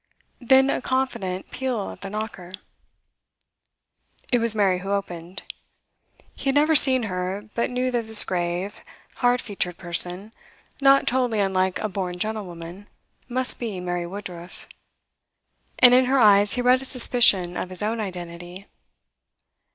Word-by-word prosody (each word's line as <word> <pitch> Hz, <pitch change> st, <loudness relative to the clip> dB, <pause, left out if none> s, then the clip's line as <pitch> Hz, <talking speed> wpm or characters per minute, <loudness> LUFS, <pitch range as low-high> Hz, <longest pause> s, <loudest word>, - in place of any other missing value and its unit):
Then 265 Hz, +2 st, +3 dB
a -, -, -3 dB
confident 235 Hz, -9 st, -3 dB
peal 250 Hz, -6 st, -4 dB
at -, -, -14 dB
the 195 Hz, -, -7 dB
knocker. 205 Hz, -4 st, -7 dB, 1.8 s
It 245 Hz, -, +3 dB
was 230 Hz, -1 st, +2 dB
Mary 195 Hz, -4 st, +1 dB
who 195 Hz, +2 st, -8 dB
opened. 180 Hz, -3 st, -5 dB, 0.9 s
He -, -, -11 dB
had 270 Hz, 0 st, 0 dB
never 305 Hz, +2 st, +3 dB
seen 265 Hz, -4 st, +7 dB
her, 190 Hz, +2 st, -5 dB
but 235 Hz, -, -2 dB
knew 250 Hz, +1 st, -2 dB
that 235 Hz, -2 st, -3 dB
this 220 Hz, -1 st, +6 dB
grave, 175 Hz, +2 st, -4 dB, 0.3 s
hard 245 Hz, 0 st, +1 dB
featured 180 Hz, -5 st, -4 dB
person, 180 Hz, +4 st, +2 dB, 0.5 s
not 275 Hz, 0 st, +4 dB
totally 245 Hz, -3 st, -1 dB
unlike 190 Hz, -2 st, 0 dB
a 215 Hz, -, -3 dB
born 185 Hz, -3 st, -5 dB
gentlewoman, 185 Hz, -2 st, -7 dB, 0.4 s
must 255 Hz, +1 st, +1 dB
be 220 Hz, -6 st, -5 dB
Mary 175 Hz, -1 st, -4 dB
Woodruff. 180 Hz, -2 st, -10 dB, 1.1 s
And 245 Hz, -1 st, +6 dB
in 255 Hz, +1 st, +4 dB
her 265 Hz, +2 st, +1 dB
eyes 205 Hz, -3 st, +4 dB
he 250 Hz, -, -2 dB
read 250 Hz, +1 st, +3 dB
a -, -, -7 dB
suspicion 225 Hz, -8 st, +3 dB
of 185 Hz, -, -5 dB
his 185 Hz, +1 st, -4 dB
own 225 Hz, +2 st, -2 dB
identity. 175 Hz, -1 st, -8 dB
205 Hz, 145 wpm, -22 LUFS, 180-245 Hz, 1.8 s, seen